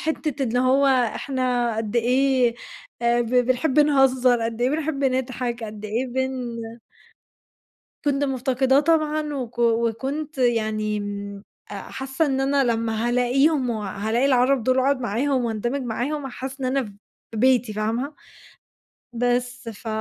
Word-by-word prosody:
حتة 305 -3 -2
اللي 245 0 0
هو 260 +2 +3
إحنا 250 -2 0
قدّ 225 +1 -2
إيه 250 0 +2 0.5
آآ، 235 0 +3
ب 235 - -1
بنحب 255 +4 +2
نهزر، 260 -4 +3
قدّ 230 +1 -3
إيه 250 - +2
بنحب 295 -2 -1
نضحك، 250 -2 -1
قدّ 210 0 -8
إيه 225 +5 -1
بن 255 -2 -3 1.5
كنت 285 0 +1
مفتقداه 265 0 +2
طبعًا 305 -1 +1
وك 245 -3 -6
وكنت 240 +6 0
يعني 215 -3 +1
امم، 200 -1 -6 0.3
حاسة 270 +4 -3
إن 270 -1 0
أنا 275 0 +2
لمّا 230 0 0
هالاقيهم 255 +3 +2
وهالاقي 220 +2 -1
العرب 255 -1 +3
دول 255 +3 +2
واقعد 265 0 +2
معاهم 250 +3 0
واندمج 240 +4 -2
معاهم 260 +5 -3
هاحس 265 +1 -7
إن 260 - -1
أنا 265 +1 +1
في 205 - -10 0.4
بيتي، 245 -2 +3
فاهمة؟ 230 +7 -2 1.0
بس 245 0 -1
ف 225 +1 -10
250 Hz, 130 wpm, -23 LUFS, 235-270 Hz, 1.5 s, هو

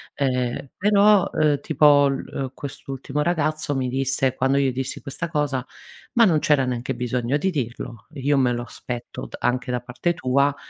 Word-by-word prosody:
Ehm 125 -1 -1
però 205 -1 +4
eh 150 -2 +2
tipo 145 0 +5
l 135 -1 -2
uhm, 135 -2 -3
quest'ultimo 135 0 -5
ragazzo 155 -2 0
mi 130 -1 0
disse 135 0 0
quando 135 +1 +1
io 135 -1 +2
dissi 130 +1 -4
questa 150 +4 -5
cosa: 145 -5 -1 0.5
"Ma 235 -2 +6
non 165 -6 +3
c'era 145 -3 +3
neanche 125 +1 -3
bisogno 125 +2 -1
di 190 +6 0
dirlo. 120 - -5
Io 145 0 +1
me 130 -2 +3
lo 120 0 -2
aspetto 120 0 -7
d - - -9
anche 125 +1 0
da 125 -1 -1
parte 125 +8 -2
tua, 140 -1 +2
135 Hz, 175 wpm, -23 LUFS, 125-150 Hz, 0.5 s, Ma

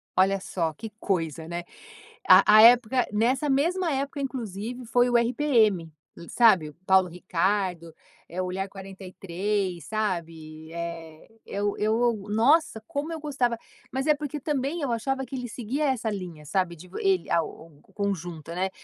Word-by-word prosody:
Olha 195 +1 +3
só 180 -4 -2
que 220 +8 -8
coisa, 165 -4 -2
né. 170 +1 -4 0.6
A 185 +1 +9 0.2
a - - +10
época, 240 +1 +6
nessa 255 +7 +1
mesma 335 +6 +1
época, 280 +1 -2
inclusive, 245 -2 -5
foi 245 +2 +3
o 240 - +4
RPM, 230 - +2 0.2
e 170 - -12
sabe, 195 -10 +4
o - - -14
Paulo 190 -1 +5
Ricardo, 180 -1 -1 0.4
eh, 180 +2 -3
o - - -2
Olhar 190 +2 -3
43, 190 -1 -4
sabe, 165 -7 -4
eh, 165 -2 -7 0.2
eu 205 0 -2
eu, 225 +3 +2 0.2
nossa, 230 +3 +3
como 305 +1 -3
eu 325 - -4
gostava, 265 -6 -1 0.3
mas 265 +3 -2
é 305 - +6
porque 295 0 -5
também 290 +3 -2
eu 275 -4 -1
achava 265 +4 -1
que 270 - -7
ele 250 -2 -5
seguia 255 +7 -2
essa 250 -5 0
linha, 180 -7 -6
sabe, 180 +2 -1
de 180 +4 -13
vo 180 - -9
ele 190 -3 +1
a 170 - +3
o 160 - -10
o 150 -3 -21
o - - -24
conjunto, 175 -6 -4
né, 185 +2 -1
205 Hz, 170 wpm, -26 LUFS, 175-250 Hz, 0.6 s, a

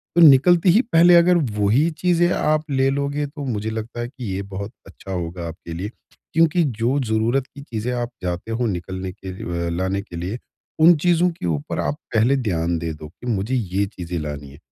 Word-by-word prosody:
तो 170 - +5
निकलते 165 +5 +7
ही 210 +8 +6
पहले 175 +2 +7
अगर 175 +1 +6 0.2
वो 105 -1 +1
ही 145 +9 +3
चीज़ें 175 -1 +3
आप 155 0 +1
ले 135 0 +2
लोगे 140 +1 -1
तो 145 0 -8
मुझे 110 -3 -2
लगता 110 +2 -5
है 120 - -2
कि 125 -1 -9
ये 100 - -2
बहुत 100 +2 -6 0.2
अच्छा 95 0 -11
होगा 85 -1 -4
आपके 85 0 -8
लिए। 95 +5 -4 0.4
क्योंकि 165 +2 +3
जो 125 0 0
ज़रूरत 120 +3 0
की 140 - -12
चीज़ें 120 -2 -4
आप 120 -1 -2
जाते 90 +5 -3
हो 120 +2 -1
निकलने 95 0 -4
के 95 +1 -9
लिए 85 -2 -4
अ, - - -1
लाने 95 +2 -1
के 100 -4 -12
लिए, 95 +8 -4 0.4
उन 170 +2 +7
चीज़ों 175 +2 +3
के 165 - -7
ऊपर 80 +1 -2
आप 75 -3 -1 0.2
पहले 120 +5 +4
ध्यान 85 -8 -1
दे 80 -1 -3
दो 75 0 -10
कि 100 +8 -12
मुझे 115 +2 -1
ये 100 -3 0
चीज़ें 90 -3 -6
लानी 75 -2 -6
है। 70 - -14
110 Hz, 210 wpm, -22 LUFS, 90-140 Hz, 0.4 s, निकलते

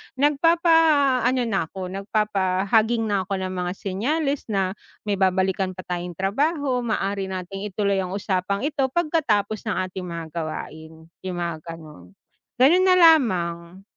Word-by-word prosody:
nagpapaano 290 -4 +3
na 195 -8 -1
ako, 185 +1 -7
nagpapahaging 205 +2 +1
na 200 -4 -1
ako 195 - -1
ng 185 0 -3
mga 180 -1 -3
senyales 275 +11 -2
na, 195 -3 0 0.3
"May 205 -2 -2
babalikan 190 0 +1
pa 185 - -8
tayong 175 -1 -5
trabaho. 270 - 0
Maaari 200 -4 -2
nating 190 +2 -5
ituloy 200 -1 0
ang 185 0 -3
usapang 200 +1 -1
ito 285 -2 0
pagkatapos 280 -11 +1
ng 215 - 0 0.2
ating 180 -1 -6
mga 170 -1 -5
gawain." 160 0 -7 0.2
Yung 185 -2 -5
mga 170 -2 -4 0.2
ganun. 125 - -14 0.4
Ganun 315 +9 +5
na 365 - +6
lamang. 190 - +3
195 Hz, 135 wpm, -23 LUFS, 185-260 Hz, 0.4 s, na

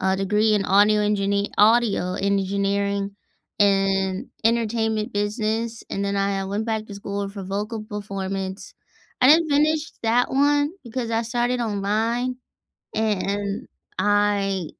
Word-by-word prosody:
a 190 0 +1
degree 210 +3 +2
in 200 -1 +1
audio 210 +2 +4
enginee 200 -1 0
audio 210 -4 +3
engineering 200 0 -1 0.4
and 195 -1 +2 0.2
entertainment 225 -1 0
business, 220 +2 -2
and 200 0 -2
then 200 0 -1
I, 195 0 0
uh, 190 - -4
went 205 +3 -3
back 220 -1 -1
to 205 - -9
school 200 0 -4
for 200 -1 -7
vocal 210 +3 -4
performance. 195 -2 -5 0.5
I 255 - +7
didn't 320 +1 +6
finish 305 +2 +2
that 235 +2 +2
one 290 +2 +3
because 235 0 -4
I 225 0 +1
started 240 +1 -1
online, 225 +4 -1 0.6
a - - 0
and 200 -1 -1 0.3
I 205 -3 +1
205 Hz, 135 wpm, -23 LUFS, 200-225 Hz, 0.6 s, I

